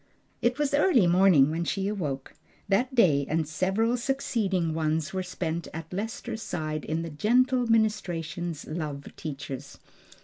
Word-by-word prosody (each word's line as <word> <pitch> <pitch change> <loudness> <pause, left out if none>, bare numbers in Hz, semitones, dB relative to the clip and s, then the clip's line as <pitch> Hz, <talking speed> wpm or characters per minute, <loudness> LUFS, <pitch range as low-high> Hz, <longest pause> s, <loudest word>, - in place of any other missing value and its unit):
It 240 +1 +1
was 295 -2 0
early 285 - +4
morning 175 -5 +5
when 165 +2 -1
she 195 +3 -1
woke. 145 -10 -4 0.3
That 250 +7 +1
day 155 - +5
and 160 0 0
several 195 +9 +1
succeeding 215 -10 0
ones 155 0 -1
were 190 - -1
spent 170 -2 -3
at 165 +1 -7
Lester's 220 +2 -4
side 155 -5 -3
in 160 +2 -2
the 165 - -6
gentle 245 - +2
ministrations 175 -7 0
love 150 -3 -5
teaches. 140 -2 -7
175 Hz, 140 wpm, -27 LUFS, 155-220 Hz, 0.3 s, morning